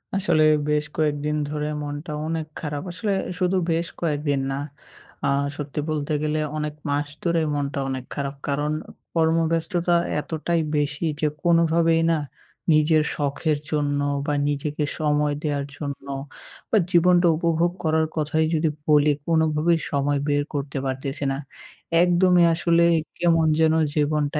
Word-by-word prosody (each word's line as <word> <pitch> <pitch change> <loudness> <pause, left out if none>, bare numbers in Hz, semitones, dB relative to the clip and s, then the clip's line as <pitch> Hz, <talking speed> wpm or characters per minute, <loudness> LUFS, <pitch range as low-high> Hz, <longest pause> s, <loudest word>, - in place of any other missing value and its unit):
আসলে, 170 -6 +2 0.3
বেশ 150 0 +1
কয়েকদিন 150 -1 0
ধরে 150 0 -2 0.2
মনটা 145 +2 -5 0.2
অনেক 160 -1 -2
খারাপ। 145 -1 -4
আসলে 195 +3 -2 0.3
শুধু 185 0 +2
বেশ 165 +1 0
কয়েকদিন 145 -3 0
না, 135 - -2 0.7
আ - - +2 0.3
সত্যি 145 0 -4
বলতে 150 -1 -2
গেলে 155 0 0 0.2
অনেক 150 -1 -2 0.2
মাস 145 +1 0 0.2
ধরে 170 -1 +2
মনটা 140 -1 -2
অনেক 130 -1 -4
খারাপ। 140 0 -3
কারণ, 145 +1 0 0.4
কর্মব্যস্ততা 165 +1 +1 0.2
এতটাই 165 +2 -1 0.2
বেশি 145 +2 -1
যে, 155 - +2 0.2
কোনোভাবেই 165 -1 +3
না 165 - +2 0.6
নিজের 155 0 +4
শখের 145 +1 0
জন্য 145 -2 0 0.3
বা, 150 - 0
নিজেকে 145 +1 -2 0.2
সময় 150 -1 +1
দেওয়ার 145 -2 -1
জন্য 140 -2 -6 0.6
বা, 225 - +3
জীবনটা 175 0 +5
উপভোগ 170 +1 +1
করার 160 0 +2
কথাই 155 0 +1
যদি 160 0 +2 0.2
বলি, 150 -1 +5 0.2
কোনোভাবেই 160 0 +2
সময় 140 0 +1
বের 145 0 +2
করতে 140 -1 -3
পারতেছি 135 +2 -3
না। - - -3 0.7
একদমই 180 0 +4
আসলে 170 +1 +3 0.3
কেমন 165 -2 +3
যেন 160 -1 +4 0.2
জীবনটা 150 0 +1
155 Hz, 135 wpm, -24 LUFS, 145-165 Hz, 0.7 s, জীবনটা